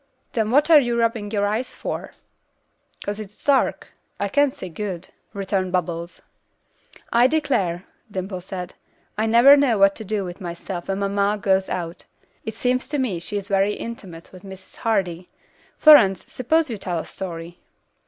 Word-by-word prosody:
"Then 220 -2 0
what 290 +7 +3
are 310 - +10
you 240 -3 0
rubbing 230 -3 0
your 205 -1 0
eyes 220 +5 -2
for?" - - -5 1.0
"'Cause 205 +1 -3
it's 210 -1 -10
dark. 280 -2 +2 0.3
I 200 - -1
can't 285 +6 +3
see 190 - -8
good," 185 0 -5 0.2
returned 195 -2 -2
Bubbles. 170 -1 -3 0.9
"I 240 +2 +6
declare," 255 - 0 0.2
Dimple 185 -1 -5
said, 180 -1 -7 0.4
"I 215 +2 0
never 240 +5 +8
know 275 -6 +3
what 195 0 +5
to 220 - -7
do 205 -1 -2
with 180 +2 -8
myself 175 0 -6
when 195 0 -1
mamma 200 +1 0
goes 190 -1 +1
out; 170 -1 -5 0.4
it 220 -1 -5
seems 250 +2 0
to 295 - -2
me 240 -11 -1
she 205 +4 -5
is 200 -1 -5
very 200 0 +2
intimate 190 -8 -8
with 185 - -13
Mrs. 190 -1 -12
Hardy. 185 -6 -1 0.5
Florence, 230 - +7
suppose 315 +6 +1
you 225 -5 -5
tell 180 -2 -2
a 160 - -4
story." 170 -2 -7
200 Hz, 165 wpm, -22 LUFS, 185-230 Hz, 1.0 s, are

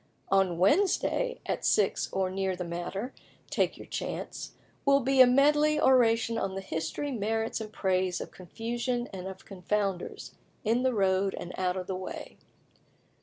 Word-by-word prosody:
"On 190 -3 +3
Wednesday, 400 - +2
at - - -2
six - - +2
or 190 -1 0
near 190 0 -1
the 180 - -4
matter, 175 +7 -4 0.4
take - - +1
your - - -10
chance, - - -5 0.3
will 280 0 +5
be 265 +1 +4
a 255 - +9
medley 295 +4 +4
oration 230 -4 +4
on 190 -1 -2
the 195 - -3
history, 175 - -3
merits, 225 -1 -1
and 215 -1 -6
praise 185 -3 0
of - - -7
confusion 235 +6 -3
and 190 -1 -6
of 190 0 -9
confounders, 195 -1 -3 0.3
in 230 +2 +2
the 255 -2 +1
road 195 -1 +2
and 175 - -7
out 185 0 0
of 185 - -3
the 190 - -3
way. 185 0 -7
200 Hz, 160 wpm, -29 LUFS, 185-250 Hz, 0.4 s, a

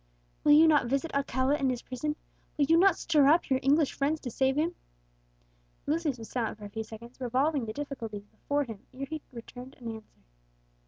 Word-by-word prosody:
"Will 295 - +6
you 315 +2 +8
not 295 -5 +4
visit 275 +6 -1
Alcala 275 0 +1
in 270 -3 +1
his 250 -2 -3
prison? 295 +4 -3 0.4
will 290 - +3
you 325 - +4
not 370 +1 +5
stir 300 -4 +3
up 315 0 +3
your 260 - +3
English 285 +2 +3
friends 295 +3 0
to 245 - -5
save 265 +3 +1
him?" 330 +3 +1 1.1
Lucius 305 -3 0
was 225 -1 -9
silent 235 -4 -2
for 210 - -10
a - - -7
few 220 +2 -4
seconds, 235 +4 -12
revolving 260 +2 +1
the - - -3
difficulties 230 -8 -6
before 285 +7 -2
him, 225 -6 -8 0.2
ere 275 +1 -4
he 310 +2 -6
returned 250 +2 -10
an 235 -2 -5
answer. 220 - -20
275 Hz, 200 wpm, -29 LUFS, 240-300 Hz, 1.1 s, you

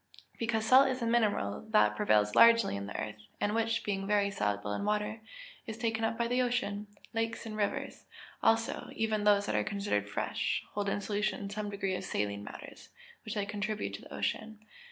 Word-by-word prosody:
_ - - -28
Because 225 -1 0
salt 260 +4 +7
is 260 -2 -2
a - - +1
mineral 210 - +1
which 105 0 +3
prevails 105 0 +3
largely 230 - +6
in 100 0 -4
the 105 - -5
earth, 105 0 -5 0.2
and 205 0 0
which, 225 0 0
being 195 -1 -2
very 200 -1 +2
soluble 105 - -1
in - - -2
water, 210 +1 -1 0.5
is 220 -1 -5
taken 225 -1 -1
up 225 0 0
by 235 0 +1
the 250 +1 +2
ocean. 215 -4 -1 0.3
Lakes 225 0 -2
and 220 -1 -5
rivers, 205 -1 -2 0.4
also, 225 0 +1
even 215 -2 0
those 205 -1 +5
that - - -2
are - - +2
considered 200 - -1
fresh, 100 - -1
hold 205 -1 -1
in 205 - -1
solution 205 -1 -2
some 210 0 -3
degree 195 -1 -2
of 185 - -3
saline 100 0 -2
matters, - - -10 0.4
which 215 - -4
they 205 -1 0
contribute 210 +1 -3
to - - -6
the - - -14
ocean. 220 -1 -3
210 Hz, 195 wpm, -31 LUFS, 195-225 Hz, 0.5 s, salt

